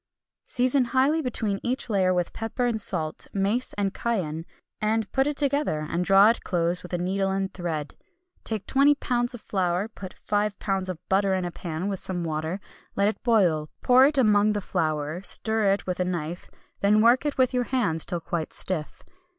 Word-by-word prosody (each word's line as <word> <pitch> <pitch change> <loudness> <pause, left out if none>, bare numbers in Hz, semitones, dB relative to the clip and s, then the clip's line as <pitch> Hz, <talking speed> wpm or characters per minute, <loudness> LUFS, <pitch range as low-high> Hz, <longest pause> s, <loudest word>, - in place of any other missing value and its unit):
Season 255 +1 +2
highly 270 +6 +2
between 220 -7 -2
each 255 +2 -2
layer 190 -5 +2
with 180 -1 -1
pepper 225 +3 -2
and 230 -3 0
salt, 160 -6 -1
mace 205 +6 +1
and 200 -1 -1
cayenne, 170 -9 -2 0.3
and 215 -1 0
put 270 +1 +2
it 295 -1 -2
together, 280 - 0
and 170 +3 -1
draw 195 +2 +6
it 230 - 0
close 175 -1 0
with 180 - -11
a 175 - -1
needle 195 +2 -1
and 195 0 -2
thread. 160 -5 -4 0.5
Take 215 -3 -3
20 280 +2 +4
lbs. 245 -2 -1
of 235 - -11
flour, 185 0 -1
put 195 -4 -9
5 205 -1 -2
lbs. 195 -2 -1
of 185 - -4
butter 195 0 +2
into 180 -1 -2
a - - -11
pan 170 +1 -5
with 195 -2 -2
some 180 -2 -2
water, 160 +3 -3 0.4
let 200 +1 +3
it 220 - -6
boil, 175 -10 +2
pour 255 +2 +6
it 295 -1 -1
among 210 -4 +4
the 205 - -1
flour, 155 -2 -2
stir 220 0 +3
it 200 - -1
with 180 -1 -3
a - - +2
knife, 175 -1 -4 0.3
then 210 +2 +4
work 235 +3 +5
it 295 -1 -2
with 260 -1 +2
your 250 -1 0
hands 205 -12 +1
till 175 - -2
quite 165 -1 -4
stiff. 165 -5 -3
195 Hz, 195 wpm, -25 LUFS, 175-235 Hz, 0.5 s, draw